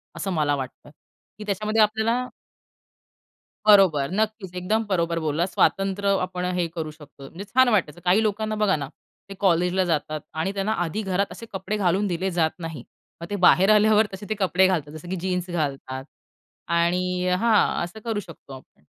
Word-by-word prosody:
असं 195 - -3
मला 150 -4 +1
वाटतं, 135 +1 -7 0.5
की 210 - -8
त्याच्यामध्ये 215 +2 0
आपल्याला 220 +4 +1 1.4
बरोबर, 185 -9 +5
नक्कीच, 210 -2 -2
एकदम 210 +5 0
बरोबर 170 -3 0
बोलला. 155 +3 0
स्वातंत्र्य 195 +1 +1
आपण 185 0 -4
हे 175 -1 +1
करू 160 -2 -4
शकतो. 145 -3 -13
म्हणजे 185 +7 -9
छान 260 0 +6
वाटायचं. 180 -8 0
काही 185 +5 +4
लोकांना 215 0 -1
बघा 200 -4 +3
ना, 140 -2 -5 0.4
ते 195 - -8
कॉलेजला 180 0 +2
जातात 155 -2 -1 0.2
आणि 190 +4 -1
त्यांना 200 +2 -1
आधी 175 +6 -3
घरात 195 0 0
असे 230 - -10
कपडे 190 +2 -3
घालून 195 0 +1
दिले 185 +1 -1
जात 165 -2 0
नाही. 165 -3 -7 0.4
मग 170 - -6
ते 205 - -1
बाहेर 190 +3 +5
आल्यावर 215 +1 +4
तसे 190 +2 -8
ते 215 - 0
कपडे 190 -1 +3
घालतात. 160 -6 -1
जसं 155 +2 -10
की 190 - -2
जीन्स 180 0 -2
घालतात 135 -5 -3 0.7
आणि 180 +2 +1
हां, 205 0 +2
असं 175 +6 -9
करू 225 -3 -1
शकतो 165 -7 -13
आपण. 130 - -19
185 Hz, 170 wpm, -24 LUFS, 170-205 Hz, 1.4 s, छान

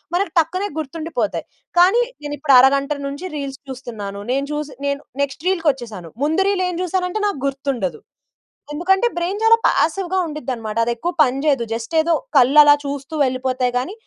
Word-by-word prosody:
మనకు 365 -1 0
టక్కునె 370 +5 0
గుర్తుండిపోతాయి. 310 -7 -3 0.3
కానీ, 380 +7 +5 0.2
నేను 290 0 -4
ఇప్పుడు 280 -1 +3
అరగంట 275 +2 +3 0.2
నుంచి 285 +6 -6
రీల్స్ 275 -2 -5
చూస్తున్నాను. 220 -6 -7
నేను 275 +2 0
చూసి, 300 -1 -4
నేను 280 0 -1 0.2
నెక్స్ట్ 280 +3 -6
రీల్‌కొచ్చేసాను. 260 - -2
ముందు 315 +5 +2
రీల్ 385 -2 0
ఏం 360 - -4
జూసానంటే, 365 +2 -1
నాకు 400 -9 -3
గుర్తుండదు. 265 - -3 0.7
ఎందుకంటే, 385 +8 +2
బ్రైన్ 360 +4 -2
చాలా 455 0 +6
పాసివ్‌గా 370 +3 +1
ఉండిద్దినమాట. 250 -8 -5
అది 235 - 0
ఎక్కువ 340 +9 -3
పని 260 -1 0
చేయదు. 275 -5 +2
జస్ట్ 230 +5 -5
ఏదో 335 +1 +1 0.2
కళ్ళు 270 +3 +6
అలా 290 0 +7
చూస్తూ 280 +1 -5
వెళ్ళిపోతాయి 255 -1 -1
కానీ, 265 +10 -5
285 Hz, 160 wpm, -20 LUFS, 255-345 Hz, 0.7 s, అలా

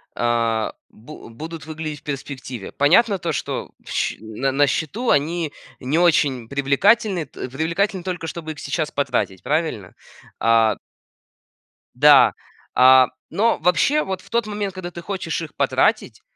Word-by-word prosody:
а, 115 -2 0 0.2
бу 120 +1 -13
будут 160 +7 -8
выглядеть 155 -2 -6
в - - -44
перспективе. 130 -5 -6
Понятно 190 +8 +3
то, 170 -2 -3
что - - -4
щ - - -2
на 110 +5 -3
на 145 +1 +3
счету 200 - -2
они 155 +2 +1 0.3
не 140 +5 -1
очень 145 -9 +2
привлекательны 170 - +2
т 130 -2 -8
привлекательны 170 +7 -1
только, 180 -3 -4
чтобы 160 +1 -6
их 155 - -9
сейчас 155 -4 -2
потратить, 120 -9 -1
правильно? 150 - -2 0.4
А 115 -2 +3 1.2
да, 145 +2 +7 0.4
а, 130 0 +7 0.2
но 230 +3 +1
вообще, 185 - +2
вот 190 -1 -4
в - - -19
тот 235 -2 0
момент, 205 -2 -3
когда 180 -2 -7
ты 175 - -8
хочешь 170 -2 -4
их 160 - -8
потратить, - - +1
155 Hz, 145 wpm, -21 LUFS, 130-175 Hz, 1.2 s, да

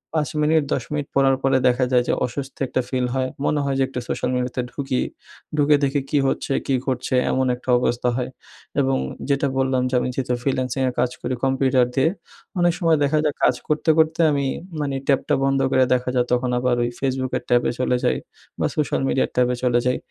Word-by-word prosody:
৫ 150 -4 +1
minute, 155 +1 +3
১০ - - -1
minute 145 -1 -2
পড়ার 135 -1 +4
পরে 135 -1 +3
দেখা 125 +1 +2
যায় 125 -1 +4
যে - - +2
অসস্তি 135 +2 -6
একটা 130 - 0
ফিল 125 -1 0
হয়। 130 0 0 0.2
মনে 150 - +1
হয় 135 -1 0
যে - - +4
একটু 130 -1 -5
সোশ্যাল - - -2
মিডিয়াতে 125 0 -1
ঢুকি। 135 -3 -2 0.6
ঢুকে 145 0 +5
দেখি 140 0 +1
কী 145 - +1
হচ্ছে, 135 - -1
কী 135 - +2
ঘটছে 130 -1 -1 0.2
এমন 130 0 +1
একটা 125 +1 -11
অবস্থা 120 0 0
হয় 125 0 -2 0.5
এবং 135 0 +1 0.3
যেটা 140 0 +2
বললাম 130 -1 +1
যে - - -9
আমি 125 - -1
যেহেতু 125 -2 -1
ফ্রিল্যান্সিং 130 -1 -1
এ - - -3
কাজ 125 - +1
করি 130 - -2
কম্পিউটার 130 -1 +3
দিয়ে, 135 +4 +3 0.5
অনেক 175 -1 +3
সময় 165 -3 +3
দেখা 150 +2 +2
যায় 150 - 0
কাজ 125 - +4
করতে, 155 +1 0
করতে 160 +1 +2
আমি 140 -1 0 0.3
মানে 140 -2 -2
ট্যাবটা 140 +1 +2
বন্ধ 135 0 +2
করে 130 - +4
দেখা 125 0 0
যায় 125 -1 +3
তখন 125 0 +1
আবার 125 -1 +1
ওই 120 - 0
Facebook-কের 130 -1 -1
ট্যাবে 120 0 +3
চলে 125 -1 +1
যাই - - +2 0.4
বা - - +1
সোশ্যাল 145 -4 0
মিডিয়ার 135 - +1
ট্যাবে 125 0 +2
চলে 120 -1 +3
যাই। 125 - +2
130 Hz, 205 wpm, -22 LUFS, 125-140 Hz, 0.6 s, ঢুকে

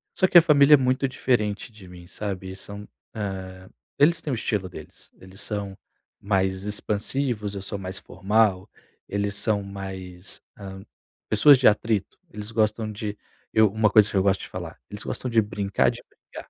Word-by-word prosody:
só 185 - +3
que 180 - +6
a - - +11
família 150 -2 +5
é - - +3
muito 130 +1 +1
diferente 115 -4 -1
de 105 -4 -15
mim, 90 -1 -13
sabe, 95 -1 -5
são, 100 +1 -8 0.3
eh, 95 -3 -6 0.3
eles 165 +4 +4
têm 150 - -4
o - - 0
estilo 105 -4 -2
deles, 90 - -12
eles 95 +1 -9
são 100 -3 -3 0.4
mais 95 -1 0
expansivos, 105 +1 -1
eu 100 - -5
sou 100 +1 -5
mais 95 0 -4
formal, 100 -2 0 0.4
eles 100 0 -2
são 105 -1 +2
mais, 95 -2 -4 0.2
hã, 95 -1 -9 0.5
pessoas 140 +7 +7
de 130 - +4
atrito, 105 -1 +1
eles 105 +1 -7
gostam 110 0 0
de 105 -1 -5 0.4
eu 110 -2 +4
uma 110 +1 +2
coisa 105 0 +5
que 100 - -2
eu 95 - +3
gosto 95 -1 +2
de - - -7
falar, - - -8
eles 105 0 -8
gostam 125 - -4
de 115 -1 +4
brincar 100 -2 0
de - - -10
brigar. - - -13
105 Hz, 180 wpm, -24 LUFS, 95-110 Hz, 0.5 s, a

